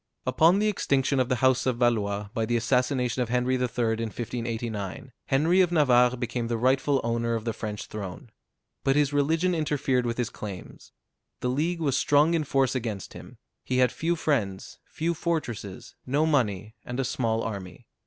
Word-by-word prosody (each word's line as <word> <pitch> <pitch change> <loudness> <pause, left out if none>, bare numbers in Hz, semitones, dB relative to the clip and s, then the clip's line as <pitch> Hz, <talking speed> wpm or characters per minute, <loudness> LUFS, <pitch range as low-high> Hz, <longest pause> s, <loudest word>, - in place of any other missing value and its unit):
Upon 170 +4 +4
the 210 +1 +2
extinction 140 -9 +1
of 130 -1 +1
the 125 - +2
house 130 0 +3
of 125 -2 +1
Valois, 105 -4 0
by 110 -1 -1
the 120 +1 +1
assassination 125 +1 +1
of 120 - -1
Henry 125 +1 +1
III. 130 - 0
in 115 -2 -1
1589, 115 0 -4 0.2
Henry 160 +7 +3
of 180 -2 +2
Navarre 125 -6 +4
became 120 -1 -3
the 115 0 -1
rightful 130 +3 +2
owner 115 0 0
of 110 0 -4
the 115 - -1
French 105 -2 -5
throne. 100 +1 -8 0.5
But 135 - +2
his 145 -1 +2
religion 160 +5 +2
interfered 145 -6 0
with 115 - -2
his 120 -3 -2
claims. 100 -4 -9 0.5
The 125 - 0
League 165 +6 -1
was 140 -4 +1
strong 145 +4 +3
in 160 -3 +1
force 135 -2 +1
against 110 -7 -4
him: - - -12 0.3
he 130 - -1
had 125 -1 +4
few 170 +2 -1
friends, 115 - -2
few 170 +2 -2
fortresses, 150 - -4
no 145 +4 +2
money, 110 - 0
and 125 +1 -5
a 135 - +1
small 115 -3 -1
army. 100 -4 -6
125 Hz, 180 wpm, -26 LUFS, 115-145 Hz, 0.5 s, Upon